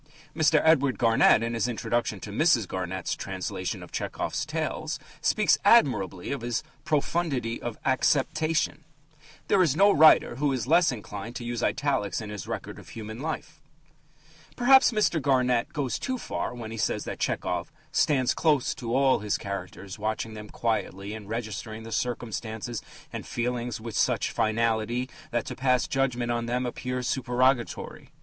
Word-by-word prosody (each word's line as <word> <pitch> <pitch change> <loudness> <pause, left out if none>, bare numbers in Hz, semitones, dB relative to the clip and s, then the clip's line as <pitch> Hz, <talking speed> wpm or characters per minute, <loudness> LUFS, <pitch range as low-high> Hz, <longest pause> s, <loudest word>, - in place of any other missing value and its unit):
Mr. 155 -1 +4
Edward 140 -5 +4
Garnett, 115 -1 +5
in 115 0 -2
his 115 0 0
introduction 120 -2 -1
to 100 - -7
Mrs. 120 - +3
Garnett's 95 0 -3
translation - - -4
of - - -13
Tchehov's - - -3
tales, - - -2 0.2
speaks - - +3
admirably 95 +2 +3
of 140 - -3
his 120 +2 -2 0.2
"profundity 145 -6 -1
of 120 -2 -5
acceptation." 150 +4 +1 0.6
There 195 - +4
is 155 -6 +3
no 200 +4 +6
writer 155 -6 +6
who 145 0 +1
is 125 -4 -2
less 165 +3 +4
inclined 105 0 -7
to 120 - -5
use 120 0 -3
italics 120 -11 0
in 105 -2 -6
his 105 -4 -6
record - - -5
of - - -14
human 110 0 -7
life. 155 0 -5 0.9
Perhaps 265 +2 +6
Mr. 210 -7 +1
Garnett 125 -3 +2
goes 140 -4 -2
too 260 -1 -2
far - - -3
when 115 -2 -7
he 115 - -6
says - - 0
that - - -6
Tchehov 90 0 -1 0.2
"stands 145 -5 +2
close 155 -2 +2
to 125 -6 -3
all 135 -1 +4
his 105 0 -1
characters, 100 0 -6
watching 110 +1 -2
them 105 -1 -9
quietly 105 -3 -2
and 105 -2 -9
registering 110 0 -5
their 115 - -9
circumstances 115 -1 -3 0.3
and - - -4
feelings 120 -1 -2
with 110 -2 -7
such - - +1
finality 115 +2 0 0.2
that 120 -2 -1
to - - -5
pass 130 -1 +2
judgment 125 -3 0
on 120 0 -1
them 125 +1 0
appears 125 +1 -3
supererogatory." 125 -1 0
120 Hz, 155 wpm, -27 LUFS, 110-140 Hz, 0.9 s, no